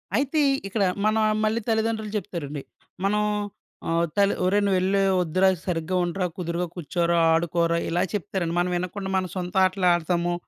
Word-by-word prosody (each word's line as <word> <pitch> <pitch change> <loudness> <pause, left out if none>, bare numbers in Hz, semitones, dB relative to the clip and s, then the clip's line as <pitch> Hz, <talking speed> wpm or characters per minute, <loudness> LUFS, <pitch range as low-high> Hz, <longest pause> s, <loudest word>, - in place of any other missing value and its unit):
అయితే 285 +3 +1 0.3
ఇక్కడ, 200 +1 0 0.2
మన 215 0 +3 0.3
మళ్ళీ 220 +2 +1
తల్లిదండ్రులు 220 -1 0
జెప్తారండి. 150 -7 -5 0.4
మనం 210 +2 +2 0.7
ఆహ్, 165 +1 +2
తల్లి 200 0 +3
ఒరేయ్! 200 +3 +2
నువ్వెలే 190 +1 +2 0.2
ఒద్దురా. 185 +3 +2 0.2
సరిగ్గా 175 0 -2
ఉండరా, 180 +2 -1
కుదురుగా 175 0 -2
కూర్చోరా, 170 0 0 0.2
ఆడుకోరా, 170 0 +1
ఇలా 175 +1 +1
చెప్తారండి. 185 -3 -2
మనం 175 +1 +1
వినకుండా 185 +2 -3
మన 190 -1 +1
సొంత 180 0 -5
ఆటలాడతాము. 175 -2 +1
180 Hz, 135 wpm, -25 LUFS, 170-200 Hz, 0.7 s, మన